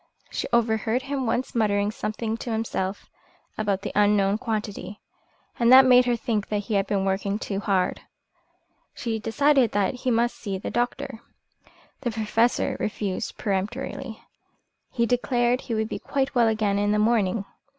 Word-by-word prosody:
She -, -, -3 dB
overheard 230 Hz, +1 st, +1 dB
him 270 Hz, -2 st, -2 dB
once 245 Hz, +4 st, -1 dB
muttering 205 Hz, -3 st, +1 dB
something 220 Hz, +1 st, -3 dB
to 235 Hz, -, -5 dB
himself 210 Hz, -3 st, -3 dB, 0.5 s
about 200 Hz, -2 st, -1 dB
"the -, -, -3 dB
unknown 205 Hz, 0 st, +3 dB
quantity," 210 Hz, -3 st, -4 dB, 0.6 s
and 235 Hz, 0 st, +4 dB
that 260 Hz, +1 st, +10 dB
made 250 Hz, -1 st, +6 dB
her 245 Hz, -1 st, +2 dB
think 225 Hz, -3 st, -2 dB
that 210 Hz, -, -1 dB
he 225 Hz, -, -3 dB
had 195 Hz, -1 st, +1 dB
been 195 Hz, -2 st, 0 dB
working 195 Hz, +1 st, 0 dB
too 200 Hz, -3 st, -3 dB
hard. 195 Hz, -3 st, 0 dB, 0.9 s
She 225 Hz, -2 st, -3 dB
decided 260 Hz, +2 st, +2 dB, 0.2 s
he 255 Hz, 0 st, -3 dB
must 240 Hz, 0 st, +1 dB
see 200 Hz, -3 st, -4 dB
the 190 Hz, -, -5 dB
doctor. 245 Hz, +1 st, -2 dB, 0.8 s
The 255 Hz, -, -2 dB
Professor 225 Hz, +1 st, +1 dB
refused 200 Hz, -3 st, -3 dB
peremptorily. 220 Hz, +5 st, -3 dB, 0.7 s
He 235 Hz, -2 st, 0 dB
declared 245 Hz, 0 st, +1 dB
he 230 Hz, -, -3 dB
would 220 Hz, 0 st, 0 dB
be -, -, -5 dB
quite 270 Hz, -1 st, -1 dB
well 240 Hz, -3 st, +4 dB
again 215 Hz, -2 st, +1 dB
in 205 Hz, 0 st, +1 dB
the -, -, +2 dB
morning. 210 Hz, -2 st, +2 dB
220 Hz, 155 wpm, -25 LUFS, 205-240 Hz, 0.9 s, that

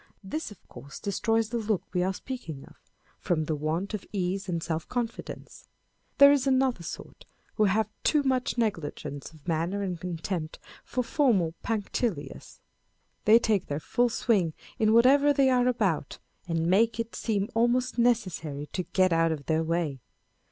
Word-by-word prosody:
This, 305 Hz, +11 st, -4 dB
of 205 Hz, -5 st, -16 dB
course, 135 Hz, +4 st, -11 dB
destroys 225 Hz, +2 st, 0 dB
the 235 Hz, 0 st, -2 dB
look 215 Hz, -3 st, -1 dB
we 180 Hz, -, +1 dB
are 185 Hz, +1 st, +1 dB
speaking 190 Hz, -, -7 dB
of, -, -, -17 dB, 0.5 s
from 160 Hz, -3 st, 0 dB
the 155 Hz, -, -1 dB
want 160 Hz, +7 st, -2 dB
of 210 Hz, -, -3 dB
ease 190 Hz, 0 st, -2 dB
and 170 Hz, -2 st, -2 dB
self 160 Hz, 0 st, -3 dB
confidence. 240 Hz, -2 st, -5 dB, 0.5 s
There 280 Hz, 0 st, +9 dB
is 280 Hz, -2 st, +2 dB
another 260 Hz, -6 st, +2 dB
sort 170 Hz, -, -8 dB, 0.3 s
who 215 Hz, -, +2 dB
have 210 Hz, +2 st, +2 dB, 0.2 s
too 300 Hz, -2 st, +3 dB
much 255 Hz, -2 st, 0 dB
negligence 150 Hz, -, -3 dB
of 155 Hz, -1 st, -19 dB
manner 170 Hz, +5 st, -1 dB
and 180 Hz, -4 st, -4 dB
contempt 170 Hz, -2 st, -4 dB, 0.3 s
for 250 Hz, -, -2 dB
formal 230 Hz, -, +2 dB
punctilios. 225 Hz, +1 st, -3 dB, 0.6 s
They 220 Hz, +2 st, +8 dB
take 215 Hz, -5 st, +1 dB
their 145 Hz, +1 st, -2 dB
full 240 Hz, +10 st, +1 dB
swing 200 Hz, -8 st, +1 dB, 0.3 s
in 215 Hz, -1 st, +4 dB
whatever 275 Hz, +5 st, +6 dB
they 270 Hz, -1 st, +4 dB
are 250 Hz, -1 st, +3 dB
about, 195 Hz, -, 0 dB, 0.3 s
and 165 Hz, -1 st, 0 dB
make 220 Hz, +7 st, +3 dB
it 230 Hz, 0 st, -3 dB
seem 205 Hz, -3 st, -1 dB
almost 240 Hz, +2 st, +1 dB
necessary 185 Hz, -12 st, 0 dB
to 185 Hz, -, -1 dB
get 185 Hz, -2 st, +4 dB
out 165 Hz, 0 st, +3 dB
of 145 Hz, -3 st, -4 dB
their 160 Hz, 0 st, +1 dB
way. 160 Hz, -4 st, -1 dB
200 Hz, 165 wpm, -28 LUFS, 165-235 Hz, 0.6 s, There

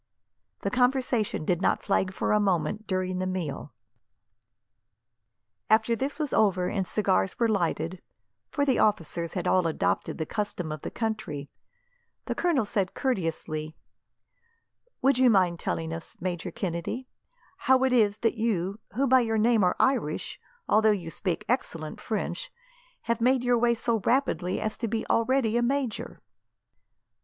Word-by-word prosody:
The -, -, -1 dB
conversation 250 Hz, -, +1 dB
did 175 Hz, +1 st, +1 dB
not -, -, +1 dB
flag 190 Hz, -2 st, +1 dB
for -, -, -1 dB
a 210 Hz, -, +4 dB
moment 195 Hz, +1 st, 0 dB
during 185 Hz, -1 st, -1 dB
the 185 Hz, -, -1 dB
meal. 170 Hz, -6 st, -4 dB, 2.0 s
After 220 Hz, +2 st, +4 dB
this 270 Hz, +5 st, -3 dB
was 300 Hz, -3 st, -2 dB
over, 190 Hz, -4 st, +3 dB
and 190 Hz, -2 st, -1 dB
cigars 190 Hz, -2 st, +1 dB
were 235 Hz, -, +2 dB
lighted 175 Hz, -4 st, -1 dB, 0.5 s
for 285 Hz, -2 st, 0 dB
the 265 Hz, -3 st, +2 dB
officers 170 Hz, -4 st, 0 dB
had 180 Hz, -3 st, -2 dB
all 185 Hz, -2 st, +3 dB
adopted 95 Hz, -, -1 dB
the 160 Hz, -, -2 dB
custom 200 Hz, -4 st, -3 dB
of 155 Hz, -2 st, -5 dB
the -, -, -4 dB
country 215 Hz, -11 st, -4 dB, 0.7 s
the -, -, -1 dB
colonel 325 Hz, -10 st, +1 dB
said 200 Hz, -3 st, -1 dB
courteously, 165 Hz, -, -2 dB, 1.3 s
"Would 270 Hz, -1 st, +4 dB
you 260 Hz, -1 st, +6 dB
mind 185 Hz, -5 st, +3 dB
telling 160 Hz, 0 st, -2 dB
us, 165 Hz, 0 st, -8 dB
Major 175 Hz, -1 st, -3 dB
Kennedy, 185 Hz, +8 st, -4 dB, 0.5 s
how 260 Hz, 0 st, +3 dB
it 260 Hz, -1 st, +2 dB
is 210 Hz, -4 st, +3 dB
that 225 Hz, -, +4 dB
you, 205 Hz, -3 st, -1 dB, 0.2 s
who 270 Hz, +4 st, +2 dB
by 260 Hz, 0 st, +6 dB
your 225 Hz, -2 st, 0 dB
name 220 Hz, -1 st, +3 dB
are 180 Hz, -, +3 dB
Irish, 245 Hz, -, 0 dB, 0.3 s
although 220 Hz, 0 st, +4 dB
you 180 Hz, -6 st, -1 dB
speak 180 Hz, +1 st, -3 dB
excellent 165 Hz, -11 st, -2 dB
French, 365 Hz, -, -3 dB, 0.5 s
have 235 Hz, 0 st, -1 dB
made 255 Hz, +1 st, +3 dB
your 245 Hz, -1 st, +3 dB
way 235 Hz, 0 st, +3 dB
so 230 Hz, 0 st, 0 dB
rapidly 210 Hz, -6 st, 0 dB
as 215 Hz, 0 st, -3 dB
to 230 Hz, -, -1 dB
be 225 Hz, +1 st, -2 dB
already 230 Hz, -1 st, +2 dB
a -, -, +2 dB
major?" 255 Hz, -1 st, -2 dB
210 Hz, 150 wpm, -27 LUFS, 180-240 Hz, 2.0 s, you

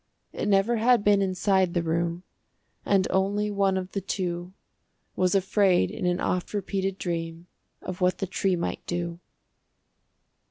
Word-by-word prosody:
It -, -, -3 dB
never 205 Hz, +4 st, +3 dB
had 235 Hz, -1 st, +4 dB
been 205 Hz, -1 st, +4 dB
inside 190 Hz, -1 st, +1 dB
the 170 Hz, -, +1 dB
room, 170 Hz, +1 st, -1 dB, 0.6 s
And 195 Hz, -2 st, +3 dB
only 205 Hz, +2 st, +1 dB
one 195 Hz, -1 st, +1 dB
of 185 Hz, 0 st, -4 dB
the 195 Hz, -, -3 dB
two 180 Hz, -2 st, -3 dB, 0.6 s
Was 185 Hz, +1 st, +2 dB
afraid 190 Hz, -, +3 dB
in 180 Hz, -, -3 dB
an 180 Hz, 0 st, +1 dB
oft 180 Hz, +3 st, -2 dB
repeated 195 Hz, -1 st, -2 dB
dream 165 Hz, -2 st, -4 dB, 0.4 s
Of 185 Hz, +1 st, -6 dB
what 180 Hz, 0 st, +2 dB
the -, -, -2 dB
tree 190 Hz, 0 st, 0 dB
might 170 Hz, -, -3 dB
do. 170 Hz, -1 st, -3 dB
190 Hz, 150 wpm, -26 LUFS, 175-195 Hz, 0.6 s, had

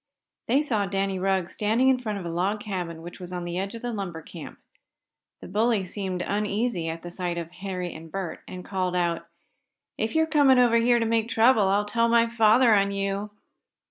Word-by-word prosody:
They 265 Hz, +5 st, +3 dB
saw 220 Hz, -9 st, 0 dB
Danny 195 Hz, -1 st, -1 dB
Rugg 190 Hz, -1 st, +1 dB
standing 220 Hz, +5 st, +1 dB
in 260 Hz, -1 st, +3 dB
front 215 Hz, -4 st, -3 dB
of 190 Hz, -, -6 dB
a -, -, -3 dB
log 190 Hz, +5 st, 0 dB
cabin 175 Hz, -5 st, -5 dB
which 175 Hz, +3 st, -9 dB
was 180 Hz, -1 st, -8 dB
on 180 Hz, -1 st, -4 dB
the 175 Hz, +1 st, -3 dB
edge 195 Hz, +4 st, -4 dB
of 230 Hz, -, -9 dB
a 245 Hz, -, -2 dB
lumber 185 Hz, -7 st, -5 dB
camp. 165 Hz, -1 st, -10 dB, 0.8 s
The -, -, -9 dB
bully 215 Hz, 0 st, +1 dB
seemed 185 Hz, -2 st, -4 dB
uneasy 205 Hz, -3 st, -1 dB
at 165 Hz, +1 st, -6 dB
the 175 Hz, -, -7 dB
sight 175 Hz, -1 st, -3 dB
of 170 Hz, -1 st, -5 dB
Harry 180 Hz, -1 st, -5 dB
and 160 Hz, 0 st, -11 dB
Bert, 190 Hz, -2 st, -4 dB
and 180 Hz, 0 st, -8 dB
called 185 Hz, -2 st, -2 dB
out: 170 Hz, -1 st, -1 dB, 0.7 s
"If 220 Hz, +5 st, -1 dB
you're 320 Hz, 0 st, +4 dB
coming 290 Hz, -5 st, +4 dB
here 240 Hz, 0 st, +4 dB
to 230 Hz, -, +1 dB
make 225 Hz, 0 st, +1 dB
any -, -, -12 dB
trouble 225 Hz, -2 st, +4 dB
I'll 200 Hz, +2 st, +2 dB
tell 230 Hz, +2 st, +1 dB
my 230 Hz, 0 st, +5 dB
father 230 Hz, +1 st, +4 dB
on 200 Hz, -1 st, +3 dB
you. 200 Hz, +1 st, -2 dB
200 Hz, 205 wpm, -26 LUFS, 180-230 Hz, 0.8 s, my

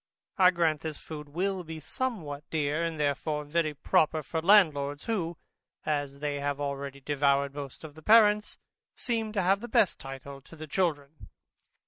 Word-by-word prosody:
I 180 Hz, -1 st, +8 dB
grant 165 Hz, -4 st, +1 dB
this 160 Hz, -2 st, -4 dB
food 150 Hz, -2 st, -9 dB
will 185 Hz, +4 st, -1 dB
be 160 Hz, -1 st, -7 dB
somewhat 155 Hz, -, -4 dB
dear, 150 Hz, +1 st, 0 dB
and 165 Hz, -2 st, -3 dB
therefore 150 Hz, +1 st, -1 dB
very 155 Hz, 0 st, 0 dB
proper 155 Hz, +2 st, +2 dB
for 160 Hz, +3 st, -3 dB
landlords, 150 Hz, -7 st, +4 dB
who, 175 Hz, -7 st, -2 dB, 0.5 s
as 145 Hz, -2 st, -1 dB
they 145 Hz, -1 st, -2 dB
have 145 Hz, 0 st, -2 dB
already 140 Hz, -1 st, -4 dB
devoured 140 Hz, 0 st, +1 dB
most 140 Hz, 0 st, -8 dB
of 155 Hz, -2 st, -9 dB
the 160 Hz, -, -14 dB
parents, 210 Hz, +2 st, +5 dB, 0.4 s
seem 225 Hz, -3 st, -2 dB
to 200 Hz, -3 st, 0 dB
have 195 Hz, +2 st, +3 dB
the 240 Hz, -, -6 dB
best 210 Hz, -4 st, +2 dB
title 135 Hz, +1 st, -9 dB
to 150 Hz, -, -15 dB
the 155 Hz, 0 st, -8 dB
children. 155 Hz, -3 st, -2 dB
155 Hz, 165 wpm, -29 LUFS, 145-180 Hz, 0.5 s, I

